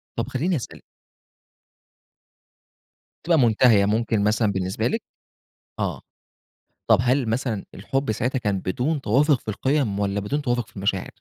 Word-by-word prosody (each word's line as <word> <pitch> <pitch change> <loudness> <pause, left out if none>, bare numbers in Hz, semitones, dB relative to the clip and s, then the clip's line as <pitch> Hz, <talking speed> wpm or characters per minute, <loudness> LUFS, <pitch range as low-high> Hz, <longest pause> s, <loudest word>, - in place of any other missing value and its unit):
طب - - -2
خلّيني 165 +7 0
أسأل 125 - -6 2.4
بتبقى 165 -2 +3
مُنتهية 110 -3 +5
ممكن 110 0 +1
مثلًا 105 0 +2
بالنسبة 95 -1 -1
لِك؟ - - -1 0.8
آه. - - -2 0.9
طب - - +6
هل 125 -1 +1
مثلًا 115 -3 -2
الحُب 135 +4 -2
ساعتها 125 +5 -1
كان 100 -5 -1
بدون 135 - -1
توافُق 135 +4 +3
في - - -19
القِيَم 125 -2 0
والّا 100 0 0
بدون 145 +9 -2
توافُق 120 -3 -1
في - - -23
المشاعر؟ 95 -1 -1
115 Hz, 135 wpm, -23 LUFS, 100-135 Hz, 2.4 s, طب